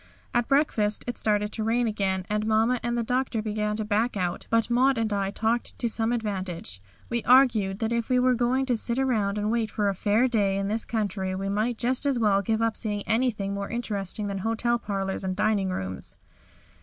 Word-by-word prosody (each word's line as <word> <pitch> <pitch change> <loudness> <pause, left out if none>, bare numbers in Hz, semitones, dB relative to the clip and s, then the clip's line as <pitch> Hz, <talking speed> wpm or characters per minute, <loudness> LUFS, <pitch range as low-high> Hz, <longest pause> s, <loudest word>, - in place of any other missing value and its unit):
At 240 -1 +1
breakfast 235 -7 +2
it 245 - -4
started 210 -1 +1
to 220 - -3
rain 235 +2 +1
again 195 -4 -1
and 210 +1 -1
Mamma 225 +3 +2
and 240 0 -1
the 235 - 0
Doctor 250 0 -1
began 210 0 -2
to 215 0 -3
back 215 +2 0
out, 180 -2 -2
but 230 -1 +2
Maud 255 +2 +3
and 220 -2 0
I 195 -1 0
talked 225 +3 -1
to 240 - 0
some 225 0 0
advantage. 190 - -3 0.3
We 235 -1 -2
argued 230 -7 +4
that 225 +2 -1
if 235 0 -1
we 255 - +3
were 255 0 +4
going 250 +2 +1
to 250 -2 +1
sit 235 +2 -1
around 220 -7 +1
waiting 230 -1 +1
for 210 -1 0
a - - 0
fair 210 +6 +2
day 205 -5 +1
in 195 0 -1
this 225 +2 -1
country 195 -4 -2
we 195 +1 -3
might 220 +4 0
just 255 +4 +1
as 275 -3 +1
well 205 -4 +3
give 220 +2 0
up 230 -1 0
seeing 205 -3 -1
anything 220 -4 0
more 200 0 -4
interesting 210 -3 -3
than 200 -1 -3
hotel 230 +3 0
parlours 195 -3 -3
and 185 -1 -2
dining 200 -1 +1
rooms. 95 - -5
220 Hz, 210 wpm, -26 LUFS, 200-235 Hz, 0.3 s, argued